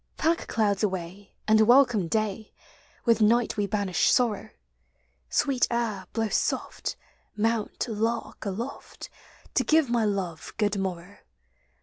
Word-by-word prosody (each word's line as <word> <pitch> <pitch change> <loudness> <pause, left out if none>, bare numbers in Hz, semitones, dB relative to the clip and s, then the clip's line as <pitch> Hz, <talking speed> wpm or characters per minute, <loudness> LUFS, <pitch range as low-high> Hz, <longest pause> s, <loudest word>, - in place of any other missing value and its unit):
Pack 330 +2 0
clouds 205 -3 +1
away, 190 -1 -4
and 215 0 +5
welcome 240 -5 +5
day. 215 +2 -2 0.5
With 230 -2 +3
night 230 +2 +3
we 205 -1 0
banish 200 -3 +1
sorrow; 235 -5 +1 0.8
Sweet 265 -3 +2
air, 220 -6 -2
blow 225 -1 -1
soft; - - -2 0.4
mount, 225 +2 -1
lark, 225 +1 -2
aloft. 220 +7 -6 0.4
To - - +2
give 315 -5 +3
my 235 -2 +2
love 190 -6 -3
good 210 -1 +1
morrow. 185 0 -5
215 Hz, 120 wpm, -27 LUFS, 200-235 Hz, 0.8 s, and